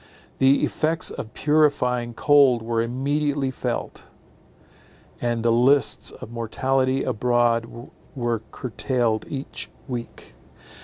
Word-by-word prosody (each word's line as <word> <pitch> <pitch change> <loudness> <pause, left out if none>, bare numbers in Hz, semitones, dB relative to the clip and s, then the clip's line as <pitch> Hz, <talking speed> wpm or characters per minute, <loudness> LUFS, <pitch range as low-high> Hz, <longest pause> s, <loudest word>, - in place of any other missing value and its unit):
The 135 +1 +4
effects 160 +1 0
of 110 - -7
purifying 125 -6 +1
cold 135 -5 +4
were 115 0 0
immediately 140 +3 -1
felt; - - -4 1.1
and 120 -1 -1
the 115 - +4
lists 125 +2 +3
of - - -11
mortality 130 +3 0
abroad 120 -1 +1 0.5
were 120 -4 -1
curtailed 120 -2 -1
each 135 -1 -6 0.2
week. 120 - -7
125 Hz, 100 wpm, -23 LUFS, 115-135 Hz, 1.1 s, The